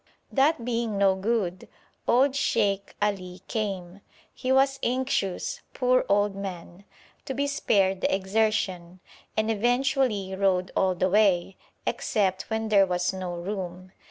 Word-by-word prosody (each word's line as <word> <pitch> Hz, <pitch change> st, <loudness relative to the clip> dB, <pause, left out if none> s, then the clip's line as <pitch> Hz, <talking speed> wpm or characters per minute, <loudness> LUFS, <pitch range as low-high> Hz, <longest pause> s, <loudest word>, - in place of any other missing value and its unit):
That 275 Hz, -2 st, +2 dB
being 230 Hz, -3 st, -1 dB
no 195 Hz, -1 st, +4 dB
good, 190 Hz, -2 st, -2 dB, 0.4 s
old 265 Hz, +3 st, +4 dB
Sheikh 200 Hz, -7 st, 0 dB
Ali 185 Hz, -3 st, -2 dB
came. 195 Hz, -3 st, -4 dB, 0.3 s
He 255 Hz, 0 st, -2 dB
was 270 Hz, +1 st, +3 dB
anxious, 250 Hz, -7 st, -1 dB
poor 255 Hz, -1 st, +2 dB
old 205 Hz, 0 st, +2 dB
man, 190 Hz, -1 st, -7 dB, 0.4 s
to 265 Hz, -, -4 dB
be 280 Hz, +2 st, 0 dB
spared 195 Hz, -9 st, +1 dB
the -, -, +1 dB
exertion, 190 Hz, -3 st, 0 dB, 0.4 s
and 215 Hz, +1 st, +2 dB
eventually 240 Hz, -3 st, +1 dB
rode 190 Hz, -2 st, +1 dB
all 190 Hz, -1 st, +2 dB
the 185 Hz, +1 st, 0 dB
way, 195 Hz, -3 st, +3 dB, 0.3 s
except 190 Hz, -3 st, -1 dB
when 220 Hz, 0 st, -2 dB
there 200 Hz, -2 st, +5 dB
was 180 Hz, 0 st, 0 dB
no 185 Hz, -2 st, -4 dB
room. 185 Hz, 0 st, -5 dB
200 Hz, 130 wpm, -26 LUFS, 185-235 Hz, 0.4 s, there